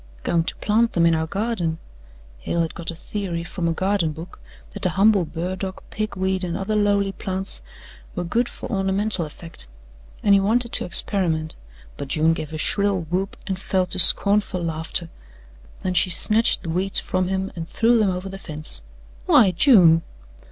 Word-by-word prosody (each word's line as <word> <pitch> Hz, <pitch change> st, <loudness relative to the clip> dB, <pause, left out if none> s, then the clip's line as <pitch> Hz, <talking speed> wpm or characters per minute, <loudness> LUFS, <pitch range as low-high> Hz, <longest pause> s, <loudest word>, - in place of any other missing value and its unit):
"Going 165 Hz, -1 st, +1 dB
to -, -, -2 dB
plant 225 Hz, 0 st, +1 dB
'em 170 Hz, -, +4 dB
in 165 Hz, -1 st, +4 dB
our 160 Hz, 0 st, -1 dB
garden." 195 Hz, -4 st, -2 dB, 0.6 s
Hale 170 Hz, -, -1 dB
had 165 Hz, -, -2 dB
got 170 Hz, -, -7 dB
a 170 Hz, -, -4 dB
theory 175 Hz, -1 st, -4 dB
from 175 Hz, 0 st, -3 dB
a -, -, +1 dB
garden 185 Hz, -2 st, 0 dB
book 165 Hz, +3 st, -10 dB, 0.3 s
that -, -, -9 dB
the 185 Hz, -, +1 dB
humble 195 Hz, 0 st, +3 dB
burdock, 185 Hz, +4 st, -5 dB
pig 215 Hz, -1 st, -3 dB
weed 190 Hz, 0 st, -1 dB
and 175 Hz, -2 st, -3 dB
other 200 Hz, +2 st, -2 dB
lowly 200 Hz, -1 st, +2 dB
plants 190 Hz, 0 st, -4 dB, 0.5 s
were 180 Hz, -, -2 dB
good 235 Hz, +8 st, 0 dB
for -, -, -8 dB
ornamental 195 Hz, -2 st, +1 dB
effect, 165 Hz, +2 st, -10 dB, 0.6 s
and 200 Hz, -, +5 dB
he 200 Hz, -, +6 dB
wanted 235 Hz, +4 st, +1 dB
to -, -, -3 dB
experiment, 165 Hz, -5 st, +2 dB, 0.4 s
but 140 Hz, -, -6 dB
June 155 Hz, +3 st, +2 dB
gave 155 Hz, -2 st, -5 dB
a 155 Hz, -, -5 dB
shrill 200 Hz, +3 st, +1 dB
whoop 190 Hz, +3 st, -2 dB
and 190 Hz, -2 st, -3 dB
fell 190 Hz, -1 st, 0 dB
to 185 Hz, +1 st, -3 dB
scornful 200 Hz, -1 st, +5 dB
laughter. 165 Hz, +1 st, -3 dB, 0.7 s
Then 185 Hz, -, -2 dB
she 180 Hz, -, +3 dB
snatched 215 Hz, +5 st, +2 dB
the 165 Hz, -, -4 dB
weeds 190 Hz, +3 st, 0 dB
from 185 Hz, -1 st, -1 dB
him 190 Hz, +1 st, -2 dB
and 165 Hz, -1 st, -6 dB
threw 235 Hz, +1 st, +3 dB
them 210 Hz, -3 st, +2 dB
over 180 Hz, +1 st, -4 dB
the 195 Hz, 0 st, -8 dB
fence. 155 Hz, -, -4 dB, 0.5 s
"Why, 195 Hz, -, +6 dB
June!" 175 Hz, -, +5 dB
185 Hz, 180 wpm, -22 LUFS, 170-200 Hz, 0.7 s, he